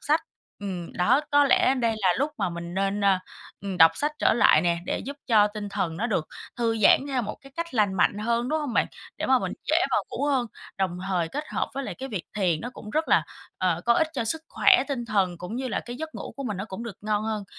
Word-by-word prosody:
sách. 310 +2 +2 0.4
Ừm, 185 -4 -5
đó, 180 +10 +3
có 290 0 +5
lẽ 265 0 +4
đây 235 -4 +1
là 195 - +2
lúc 285 +3 +1
mà - - 0
mình 170 0 -6
nên, 195 +1 0
ờ, 195 -2 +4 0.4
ừm, 195 -1 -4
đọc 165 -2 +8
sách 295 +1 +1
trở - - +4
lại 220 -8 +5
nè, 170 -1 +1
để - - -1
giúp 280 +2 -6
cho 215 -4 +5
tinh 210 -1 -5
thần 165 -4 -2
nó 225 - -1
được 185 -9 -1 0.3
thư 230 -2 0
giãn 205 - +6
theo 260 -3 0
một 215 - -5
cái 275 0 -16
cách 335 -4 -4
lành 205 -4 +2
mạnh 200 +2 +2
hơn, 235 +3 0
đúng 315 - +1
hông 285 -5 -3
bạn? - - +2 0.3
Để - - -2
mà - - +5
mình - - -3
dễ - - +2
vào - - +1
ngủ - - -2
hơn, 265 -4 +1 0.3
đồng 180 -2 -1
thời 175 -4 0
kết 295 - -4
hợp - - -2
với 275 - -3
lại - - -5
cái 265 - -7
việc 205 -9 -4
thiền 180 -6 +1
nó 245 - -5
cũng 210 - -10
rất 310 +5 0
là, - - +5 0.4
ờ, 180 -3 +1
có 235 - +4
ích 315 +5 +2
cho 245 -6 -2
sức 320 +8 -2
khỏe 380 -3 +5
tinh 255 -4 -2
thần, 195 -6 0
cũng 190 +7 -6
như 260 0 -3
là - - -1
cái 240 0 -7
giấc 315 +3 -6
ngủ - - -7
của 275 - -5
mình 210 -6 -3
nó 195 - -4
cũng 205 +1 -7
được 235 -5 -7
ngon 210 0 0
hơn. 215 -2 -2
220 Hz, 265 wpm, -26 LUFS, 190-265 Hz, 0.4 s, đọc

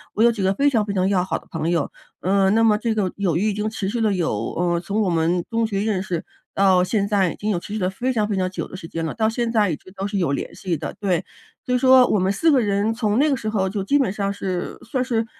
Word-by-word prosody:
我 220 - +3
有 235 - +6
几 220 -3 -4
个 190 0 +2
非 280 +7 +2
常 230 -6 +2
非 205 - -3
常 185 0 +2
要 185 -3 +2
好 180 -2 -2
的 - - -16
朋 165 0 -2
友。 170 -4 0 0.3
嗯， 195 +1 +3
那 225 - +4
么 215 -2 +4
这 230 -1 -1
个 195 -4 0
友 185 -5 0
谊 210 +5 +1
已 - - -1
经 210 +1 -2
持 215 -3 -4
续 230 +4 -2
了 215 -2 +2
有 180 -4 0 0.2
呃， 175 0 +1
从 200 +5 -2
我 200 - +1
们 170 +2 +1
中 230 0 +1
学 200 -3 -2
认 205 -3 0
识， 175 -4 -3 0.3
到 190 -2 +4
现 200 +1 0
在 195 -4 +2
已 - - -8
经 210 - -4
有 190 -5 +1
持 200 - -9
续 215 - -2
了 185 -1 0
非 250 +7 -2
常 215 -3 +1
非 210 - -1
常 185 -1 0
久 - - -4
的 - - -10
时 180 -3 -8
间 165 0 -4
了， 160 - -4
到 220 -1 +1
现 235 0 -1
在 210 -5 +2
一 - - -1
直 185 - -16
都 195 0 -4
是 200 -1 -2
有 170 -6 +1
联 140 - -3
系 175 -5 -3
的， - - -5
对。 185 -3 0 0.4
所 250 - -1
以 250 - +4
说 260 0 +7
我 210 - +2
们 185 +1 +1
4 320 +11 +2
个 275 - +4
人， 205 +1 +1
从 220 -2 0
那 295 +4 +4
个 275 - +3
时 215 -3 -4
候 195 -3 0
就 200 0 -3
基 280 +9 +2
本 265 -9 +1
上 200 -1 -1
是 185 -3 -4
算 260 -3 -1
是 230 -3 0
200 Hz, 325 characters per minute, -22 LUFS, 185-220 Hz, 0.4 s, 说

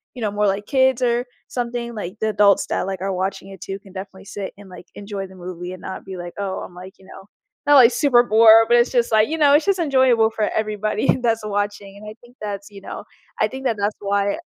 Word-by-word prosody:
you 250 - -8
know, 210 - 0
more 205 0 +1
like 200 +1 -1
kids 260 -1 +2
or 240 0 +1 0.2
something, 240 -1 -4
like, 200 -1 -6
the 220 - 0
adults 205 -1 +3
that, - - -2
like, 190 -2 -4
are 195 0 -2
watching 190 +1 -3
it 195 -2 -12
too 195 - -5
can 195 -1 -17
definitely 190 0 -9
sit 195 -1 -6
and, 205 -1 -14
like, 180 - -12
enjoy 200 -1 -6
the 190 - -16
movie 180 0 -7
and 185 - -11
not 190 - -7
be 190 -1 -7
like, 175 0 -7
"Oh, 195 -2 -3
I'm - - -9
like, 185 +2 -11
you 190 - -19
know" 195 +1 -13 0.4
not, 290 - +6
like, 250 -3 +8
super 250 -3 +4
bored, 225 0 +7
but 240 - +4
it's 240 +1 +3
just 240 -2 +1
like, 220 0 +3
you 320 - -2
know? 290 -2 +5
It's 295 +2 +4
just 395 -1 +2
enjoyable 260 -7 +3
for 215 -1 -1
everybody 215 +2 0
that's 225 -2 0
watching, 205 -1 -3
and 210 - -12
I 215 - -10
think 240 +1 -19
that's 200 -1 -6
you 200 -1 -12
know, - - -8 0.3
I - - +3
think 265 0 -8
that 230 -4 0
that's 205 +1 -1
why 200 +2 0
210 Hz, 250 wpm, -21 LUFS, 195-235 Hz, 0.4 s, like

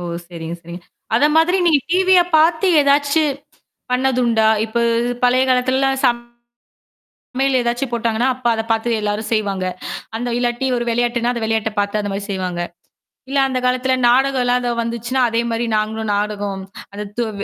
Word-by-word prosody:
ஓ! - - -6 0.3
சரிங்க, 165 -1 -6
சரிங்க. 170 +1 -9 0.3
அத 245 - +3
மாதிரி 345 +4 +4
நீங்க 305 -4 +4
டிவிய 370 0 +5 0.2
பாத்து 320 +3 +3
ஏதாச்சு 285 +2 +3 0.7
பண்ணதுண்டா 250 -4 +2 0.2
இப்ப 235 +1 -2 0.4
பழைய 250 +1 +4
காலத்துலலாம் 260 +1 +1
சப் 240 0 +1 1.1
சமையல் 265 0 +1
ஏதாச்சும் 240 +2 -1
போட்டாங்கன்னா, 235 +1 0
அப்ப 255 -1 -17
அத 225 -1 0
பார்த்து 225 +1 +1
எல்லாரும் 210 +1 -2
செய்வாங்க. 200 -4 -1 0.5
அந்த 245 +2 -3
இல்லாட்டி 245 +2 -1
ஒரு 240 - -1
விளையாட்டுன்னா, 240 0 0
அந்த 235 - -4
விளையாட்ட 220 0 0
பாத்து 205 +1 0
அந்த 205 -1 -3
மாரி 200 +1 -4
செய்வாங்க. 180 -3 -3 0.7
இல்ல 275 +1 -1
அந்த 255 -1 -1
காலத்துல 255 +1 +1
நாடகம்லாம் 250 -1 +2
அத 245 -1 -2
வந்துச்சுன்னா 235 +3 -2
அதேமாரி 230 0 -1
நாங்களும் 220 0 -2
நாடகம் 205 +1 -5
240 Hz, 140 wpm, -19 LUFS, 215-260 Hz, 1.1 s, டிவிய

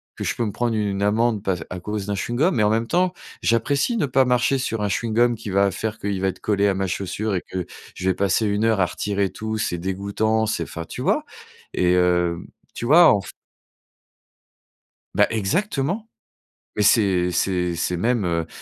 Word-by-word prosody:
que - - -5
je - - 0
peux 120 - -1
me 105 - -2
prendre 120 +2 -1
une 100 -2 -1
amende 110 0 +1
par 95 -2 0
à 90 - -5
cause 105 +1 -4
d'un 100 - -1
chewing-gum, 120 - +1
mais 115 - +1
en 105 - +3
même 115 +1 0
temps, 180 +3 +1 0.3
j'apprécie 140 - +1
ne 145 - +1
pas 130 +1 +3
marcher 125 +2 +2
sur 115 -4 -2
un 105 - 0
chewing-gum 115 +3 +1
qui 105 - -7
va 100 +1 +3
faire 110 +3 -4
qu'il 100 -2 -2
va 95 - +2
être - - -7
collé 100 -1 +1
à 100 - +2
ma 95 0 -1
chaussure 100 +3 -2
et 90 - -1
que 90 -2 -3 0.3
je 95 +1 -1
vais 95 - +1
passer 100 +3 +1
1 105 +1 0
heure 110 -3 +2
à - - +4
retirer 100 -1 -1
tout. 110 0 -4
C'est 90 -6 -1
dégoûtant, 100 +5 -1
c'est, 85 - -1
enfin, 85 0 -7
tu - - -7
vois? - - +1 0.5
Et 90 0 +2
heu, 90 -1 +2 0.3
tu 120 - -5
vois 165 +6 +7
en 100 - +1
f - - -10 1.9
Bah - - +5
exactement, 165 - -1 0.7
mais 105 - 0
c'est 95 -4 +3
c'est 90 -1 0
c'est 85 +1 -1
même, 115 +1 +1
heu 85 -1 -1
105 Hz, 205 wpm, -22 LUFS, 95-115 Hz, 1.9 s, vois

